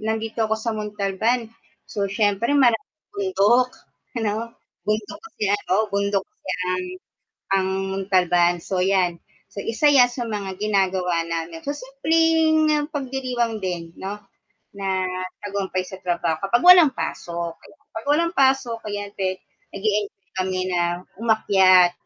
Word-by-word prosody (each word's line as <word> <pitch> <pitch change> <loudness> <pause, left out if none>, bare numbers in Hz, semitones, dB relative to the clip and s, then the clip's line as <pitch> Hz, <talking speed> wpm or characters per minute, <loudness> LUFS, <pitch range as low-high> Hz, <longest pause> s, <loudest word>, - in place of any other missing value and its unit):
nandito 220 +1 -2
ako 220 - +2
sa 225 0 -2
Montalban. 210 +3 -1 0.4
So, 200 -2 -3
siyempre 205 +3 +1
maraming 270 +3 +1
bundok 200 +6 +3 0.5
ano, 225 +1 -2 0.3
bundok 210 0 -2
kasi 445 - -6
ano, 205 -3 -1 0.2
bundok 200 -1 0
kasi - - -9 0.2
ang 185 0 -1 0.7
ang 190 -1 +1 0.4
Montalban. 175 -2 +3
So 180 +1 -1
'yan, 185 -3 +1 0.2
so 200 - -7
isa 230 +6 +1
'yan 255 -4 +6
sa 240 -1 -4
mga 200 -3 -5
ginagawa 190 -4 +1
namin. 165 0 -5
So, 285 - -2
simpleng 310 +2 +2
pagdiriwang 255 -6 -2
din 170 -2 -4
'no, 200 +2 -6 0.5
na 195 -2 -1 0.4
tagumpay 195 -2 -2
sa 185 +1 -9
trabaho, 170 -3 -1
kapag 240 +5 +2
walang 355 -6 +8
pasok, 170 -5 -4
no. - - -18 0.2
'Pag 225 +4 -7
walang 335 +3 +2
pasok, 265 -5 +2
ayan 205 0 -4
pwede, 185 -1 -2 0.3
nag-e-enjoy 200 -1 -2
kami 185 0 -1
na 175 0 0 0.2
umakyat, 190 -5 +5
205 Hz, 130 wpm, -23 LUFS, 185-240 Hz, 0.7 s, walang